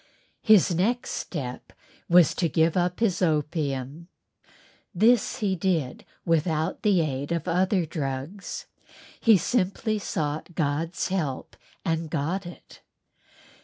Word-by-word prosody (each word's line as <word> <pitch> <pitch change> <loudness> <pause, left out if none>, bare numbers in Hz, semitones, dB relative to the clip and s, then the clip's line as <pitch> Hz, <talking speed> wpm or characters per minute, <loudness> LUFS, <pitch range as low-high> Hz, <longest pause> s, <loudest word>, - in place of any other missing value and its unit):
His 210 -5 +5
next 225 +9 0
step 130 -7 -5 0.4
was 175 -2 +6
to 170 - 0
give 160 +2 +2
up 180 +2 0
his 200 -6 +1
opium. 150 -2 -1 0.9
This 225 +4 +3
he 195 -3 +1
did 165 -7 -1 0.2
without 160 0 0
the 200 -5 +3
aid 140 -1 -3
of 170 +1 -2
other 180 +1 +2
drugs. 145 +5 -5 0.5
He 225 -3 +6
simply 215 +2 0
sought 155 -3 -3
God's 160 +4 -1
help 155 -9 -3 0.3
and 165 -1 -1
got 170 +5 -2
it. 175 - -13
170 Hz, 115 wpm, -26 LUFS, 150-190 Hz, 0.9 s, was